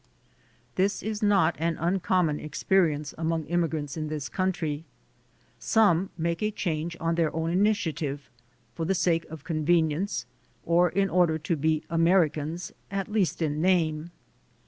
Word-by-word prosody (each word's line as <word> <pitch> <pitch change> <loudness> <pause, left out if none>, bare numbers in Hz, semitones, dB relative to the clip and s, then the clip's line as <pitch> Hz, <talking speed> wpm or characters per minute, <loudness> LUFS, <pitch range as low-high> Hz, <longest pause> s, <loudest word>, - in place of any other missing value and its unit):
This 195 +2 +1
is 215 -1 -3
not 195 -6 +3
an 165 0 0
uncommon 175 -2 +1
experience 155 -2 0
among 165 0 0
immi 170 0 +1
grants 145 -3 -4
in 155 -1 -3
this 150 -2 -4
country. 165 -5 -1 0.8
Some 195 -4 +3
make 170 +2 -1
a 210 - +1
change 170 -5 -3
on 165 0 0
their 165 -2 +1
own 165 0 -1
initiative, 165 -8 0 0.5
for 165 - -4
the 190 +4 +1
sake 165 -2 +1
of 155 -2 -9
convenience, 165 +3 0 0.4
or 175 +1 +4
in 195 +3 +1
order 175 -3 +3
to 160 +2 -1
be 155 +1 0
Americans 165 -1 +1 0.2
at 195 0 -3
least 195 -5 +1
in 150 0 -1
name. 165 -3 +1
165 Hz, 145 wpm, -27 LUFS, 155-185 Hz, 0.8 s, or